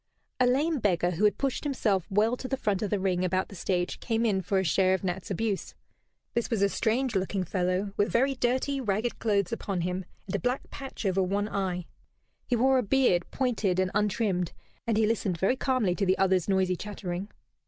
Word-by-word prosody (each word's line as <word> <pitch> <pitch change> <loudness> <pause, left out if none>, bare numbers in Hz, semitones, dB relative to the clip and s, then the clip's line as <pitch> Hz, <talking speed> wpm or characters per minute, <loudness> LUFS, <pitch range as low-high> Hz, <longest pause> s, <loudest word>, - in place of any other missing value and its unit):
A 250 - +4
lame 290 +5 +2
beggar 180 -5 +1
who 180 +5 +1
had 210 - +3
pushed 275 -2 -1
himself 215 - 0
well 215 +5 +2
to 255 - -6
the 270 - -1
front 205 -6 0
of 210 - -1
the 205 - 0
ring 185 -1 0
about 185 +1 0
the 200 - -10
stage 180 0 -1
came 230 0 0
in 195 -4 +2
for 195 +1 0
a 190 - +2
share 185 +2 +3
of 190 - -6
Nat's 180 0 -3
abuse. 205 +1 -2 0.6
This 235 - -1
was 220 -5 +1
a 200 - +4
strange 235 +3 0
looking 190 0 0
fellow, 185 +2 -1
with 205 - +2
very 265 +3 +3
dirty 260 +2 0
ragged 220 +1 -1
clothes 200 -3 +1
upon 195 -5 -2
him, 180 +2 -2 0.2
and 190 - -3
a - - 0
black 250 +2 -1
patch 270 -5 -7
over 190 0 +2
one 200 +3 0
eye. 185 -4 -2 0.6
He 245 - +2
wore 260 +2 +4
a - - +2
beard, 220 -6 +2
pointed 225 -8 0
and 185 0 +1
untrimmed, 200 -4 0 0.3
and 225 -2 +2
he 220 - +4
listened 210 -5 0
very 195 +9 +2
calmly 255 -8 +1
to 195 +2 -1
the 185 - +3
other's 190 -1 +2
noisy 190 -1 +2
chattering. 190 -1 -5
200 Hz, 210 wpm, -28 LUFS, 185-235 Hz, 0.6 s, A